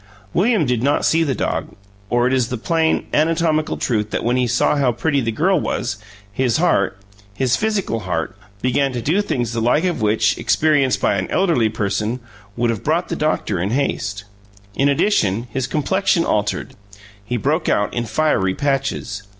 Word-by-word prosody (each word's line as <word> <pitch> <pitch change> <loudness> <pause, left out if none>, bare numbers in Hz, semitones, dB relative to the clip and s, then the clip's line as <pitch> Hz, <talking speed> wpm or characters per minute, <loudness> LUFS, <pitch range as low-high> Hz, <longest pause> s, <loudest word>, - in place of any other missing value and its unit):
William 205 -2 +2
did 125 -3 0
not 140 +3 +1
see 165 - +3
the 140 -5 -1
dog, - - -3 0.3
or 120 0 +2
it 130 - +2
is 130 -3 +2
the 125 - -4
plain, 160 +6 +1
anatomical 160 0 +1
truth 105 -4 -1
that - - -2
when 120 +2 +1
he 125 -1 +1
saw 120 - +2
how 135 -4 +2
pretty 140 +4 0
the 115 -2 -1
girl 180 - +2
was, 120 -6 -2 0.4
his 125 +2 +1
heart 155 - +1 0.4
his 130 +2 +1
physical 205 - -1
heart 90 -5 -3 0.3
began 135 +2 +1
to 120 - -2
do 160 - +1
things 120 - -2
the 115 - -1
like 125 +8 +2
of 180 -7 -1
which, 105 0 +2
experienced 145 -4 +2
by 100 - +1
an 95 - -3
elderly 165 - +2
person, 105 +4 -2 0.4
would 120 0 +1
have 110 - -5
brought 165 +4 0
the - - -2
doctor 105 - -1
in 95 - -1
haste. 105 -5 -1 0.5
In 140 +6 +2
addition, 115 - +1
his 130 +1 -2
complexion 170 +4 +1
altered 105 -1 -1 0.5
he 120 +4 -2
broke 155 +8 0
out 105 - +1
in 120 -1 -2
fiery 110 -6 +1
patches. 135 -6 -2
130 Hz, 180 wpm, -20 LUFS, 110-155 Hz, 0.5 s, see